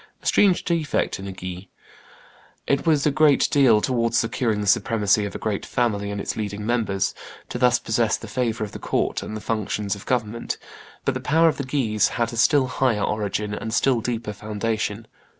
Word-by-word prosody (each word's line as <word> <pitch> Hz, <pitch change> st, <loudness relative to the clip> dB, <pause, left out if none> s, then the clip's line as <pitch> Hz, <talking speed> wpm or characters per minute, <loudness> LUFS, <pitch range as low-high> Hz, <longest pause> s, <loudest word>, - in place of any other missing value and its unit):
a -, -, -18 dB
strange 195 Hz, -3 st, +4 dB
defect 165 Hz, -, -1 dB
in 100 Hz, -, -7 dB
a -, -, -4 dB
Guise. 90 Hz, 0 st, -7 dB, 1.0 s
It 140 Hz, +4 st, 0 dB
was 150 Hz, -3 st, +3 dB
a 150 Hz, -, +4 dB
great 150 Hz, -1 st, +4 dB
deal, 125 Hz, -7 st, +5 dB
towards 115 Hz, -1 st, +1 dB
securing 115 Hz, -2 st, 0 dB
the 105 Hz, -, -2 dB
supremacy 105 Hz, 0 st, +2 dB
of 100 Hz, -, -6 dB
a -, -, -1 dB
great 105 Hz, -3 st, -2 dB
family 105 Hz, -5 st, -1 dB
and 100 Hz, 0 st, -4 dB
its -, -, -3 dB
leading 105 Hz, -1 st, -4 dB
members, 110 Hz, -5 st, 0 dB, 0.4 s
to 125 Hz, -, -4 dB
thus 125 Hz, -1 st, +4 dB
possess 110 Hz, 0 st, 0 dB
the 115 Hz, -, -10 dB
favor 115 Hz, -1 st, -1 dB
of 105 Hz, -, -5 dB
the -, -, -8 dB
court -, -, -1 dB
and 110 Hz, -, -5 dB
the -, -, -8 dB
functions 105 Hz, -2 st, -2 dB
of 100 Hz, -, -9 dB
government; 115 Hz, -2 st, -2 dB, 0.5 s
but -, -, +1 dB
the -, -, -3 dB
power 165 Hz, +2 st, +3 dB
of -, -, -3 dB
the 140 Hz, -, -2 dB
Guises 125 Hz, -6 st, +1 dB
had 120 Hz, -1 st, 0 dB
a -, -, -5 dB
still 140 Hz, +3 st, +4 dB
higher 125 Hz, -5 st, 0 dB
origin 105 Hz, 0 st, -2 dB
and 105 Hz, +2 st, -4 dB
a -, -, -5 dB
still 125 Hz, -2 st, +2 dB
deeper 115 Hz, -2 st, -3 dB
foundation. 110 Hz, +1 st, -3 dB
115 Hz, 205 wpm, -23 LUFS, 105-125 Hz, 1.0 s, deal